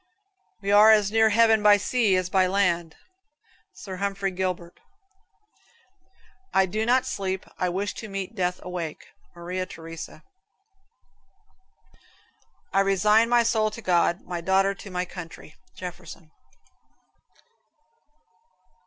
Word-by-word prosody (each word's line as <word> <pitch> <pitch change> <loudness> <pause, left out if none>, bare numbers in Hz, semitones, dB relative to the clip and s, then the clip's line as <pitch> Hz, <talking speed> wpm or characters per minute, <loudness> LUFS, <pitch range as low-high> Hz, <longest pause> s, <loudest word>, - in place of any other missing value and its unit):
"We 200 - -1
are 210 +2 +7
as 210 -2 +3
near 220 0 +4
heaven 225 0 +4
by 210 0 +6
sea 215 -1 +1
as 185 -1 0
by 185 0 +2
land," 175 -4 0 0.8
Sir 190 -2 -9
Humphrey 195 0 -2
Gilbert. 180 -2 -4 1.7
"I 190 - +3
do 215 +4 -3
not 255 +1 +3
sleep. 190 -1 -3
I 180 - 0
wish 195 +3 -3
to 220 - -8
meet 195 +1 -5
death 180 -3 -2
awake." 175 -4 -6 0.3
Maria 180 +2 -4
Theresa. 165 0 -10 2.5
"I 195 - +3
resign 210 +4 +3
my 240 -1 +4
soul 220 -2 +1
to 215 +2 -10
God; 175 0 +2
my 175 -1 -6
daughter 195 +2 +2
to 200 0 -11
my 180 -1 -2
country." 170 -3 -10 0.2
Jefferson. 175 -3 -10
190 Hz, 120 wpm, -25 LUFS, 180-210 Hz, 2.5 s, are